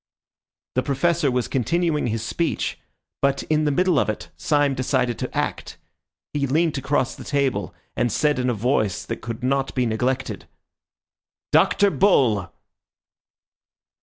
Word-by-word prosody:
The 130 - +2
Professor 150 +4 +1
was 125 -1 0
continuing 155 +3 0
his 115 -1 -2
speech, 165 +8 -2 0.4
but 140 0 +1
in 155 0 +3
the 150 - +2
middle 180 +1 +3
of - - +1
it 105 - -5
Syme 145 -2 +1
decided 130 -2 0
to - - -4
act. - - -3 0.6
He 140 -1 0
leant 155 +1 +1
across 130 -1 0
the - - -10
table, 140 -2 -1 0.2
and 120 - +1
said 150 +3 +1
in 125 0 +1
a - - +1
voice 110 -3 0
that - - -5
could 115 +1 -6
not 135 +1 0
be 125 -2 +2
neglected— 125 +4 -2 1.0
"Dr. 200 -1 +4
Bull!" 115 - +3
135 Hz, 140 wpm, -23 LUFS, 125-150 Hz, 1.0 s, Dr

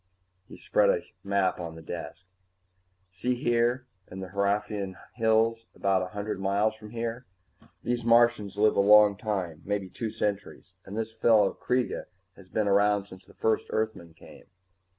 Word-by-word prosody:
He - - -12
spread - - +2
a - - +2 0.2
map 100 -2 +1
on 85 -2 -6
the 80 - -11
desk. 90 +4 -7 0.9
"See, 125 +8 -1
here 120 +1 +1 0.2
in 95 - -8
the 95 -1 -6
Hraefnian 100 0 -1 0.2
Hills, 115 0 +1
about 95 -1 +1
a 90 - -3
hundred 100 +1 -4
miles 100 +3 +1
from 110 -1 -12
here. 115 +2 -4 0.6
These 120 0 -1
Martians 115 -4 +3
live 105 +1 +4
a - - +2
long 105 0 +7
time, 95 -6 -3
maybe 100 -2 -3
two 115 - -4
centuries, 105 -1 -4
and 100 - -7
this 110 0 -3
fellow 110 -3 +4
Kreega 125 0 -1 0.3
has 95 -2 -16
been 105 +1 0
around 100 0 +3
since 95 -1 -14
the - - -19
first 110 -1 0
Earthmen 110 -7 -3
came. - - -15
105 Hz, 160 wpm, -28 LUFS, 95-115 Hz, 0.9 s, long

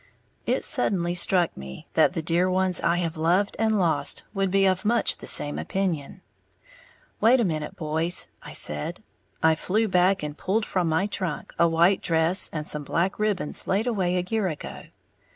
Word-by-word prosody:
It - - 0
suddenly 190 - 0
struck 175 0 +2
me 65 0 -9
that - - +3
the 165 - -3
dear 175 +3 +1
ones 185 -1 +2
I 170 +1 +1
have 165 -2 -2
loved 175 +6 +1
and 220 -1 +2
lost 160 -6 0
would 195 -2 0
be 195 +1 +3
of 185 -1 +1
much 235 +3 +1
the - - -8
same 145 - +2
opinion. 180 -3 -3 1.0
"Wait 245 +4 +5
a - - +2
minute, 155 -6 -3
boys," 160 +2 0
I - - -10
said. 75 0 -1 0.4
I 160 0 +5
flew 210 +8 0
back 185 -1 +2
and 150 -1 -5
pulled 210 +7 -1
from 180 -3 -1
my 160 +5 +1
trunk 190 -6 -4
a 170 - +5
white 170 +4 +3
dress 165 +3 +1
and 150 -1 -4
some 150 -1 -1
black 175 +8 -1
ribbons 210 -7 -1
laid 200 +4 +1
away 190 -7 0
a 180 - -1
year 220 -2 0
ago. 155 -4 -7
180 Hz, 180 wpm, -25 LUFS, 160-195 Hz, 1.0 s, Wait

